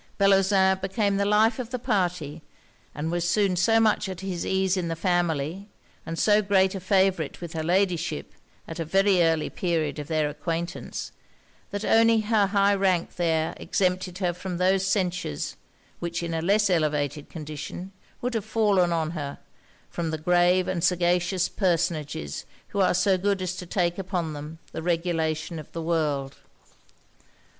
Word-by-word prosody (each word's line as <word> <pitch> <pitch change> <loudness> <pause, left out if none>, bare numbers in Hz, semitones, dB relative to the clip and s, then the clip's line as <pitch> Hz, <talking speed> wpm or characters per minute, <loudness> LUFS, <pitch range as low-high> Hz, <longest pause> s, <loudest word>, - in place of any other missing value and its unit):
Bellozane 195 -1 +4
became 200 +1 0
the 200 - +1
life 215 +4 +3
of 240 -3 -4
the 250 - -3
party; 180 - -1 0.5
and 155 +2 -3
was 175 0 0
soon 195 0 +2
so 225 +6 +3
much 215 -2 +2
at 185 -2 -6
his 185 -3 -3
ease 190 0 +1
in 180 -3 -2
the 165 - -2
family, 175 +1 -1 0.4
and 165 - -4
so 210 +3 +4
great 190 -2 +3
a 195 - -4
favourite 190 -4 +1
with 170 -1 -7
her 160 - -2
Ladyship, 175 - 0 0.3
at 165 - -7
a - - 0
very 195 +3 +3
early 165 -2 +2
period 160 -5 -1
of 145 - -6
their 155 -2 +1
acquaintance, 165 +3 -4 0.6
that 205 +1 -4
only 225 0 +5
her 215 -2 +2
high 200 0 +3
rank 190 -3 0
there 160 -2 +1
exempted 185 -2 -1
her 180 -3 0
from 180 0 -5
those 190 +1 +2
censures, 180 - -1 0.4
which, 170 0 -3
in 170 -1 -3
a 165 - -1
less 205 +4 +3
elevated 150 -3 0
condition, 155 +4 -7 0.3
would 250 0 -2
have 225 -3 -1
fallen 200 -6 +2
on 160 -2 0
her, 145 -4 -5 0.5
from 170 -2 -3
the 160 - -2
grave 180 +3 +3
and 180 -3 -2
sagacious 180 +1 +2
personages 155 - -1 0.3
who 200 - -3
are 185 -2 +3
so 185 +1 +3
good 200 +1 +1
as 185 0 -3
to 180 -1 -7
take 175 0 0
upon 180 -4 -2
them 150 +2 -8
the - - -5
regulation 165 -1 -1
of 150 - -11
the 165 - -4
world. 150 -5 -1
180 Hz, 165 wpm, -26 LUFS, 165-195 Hz, 0.6 s, only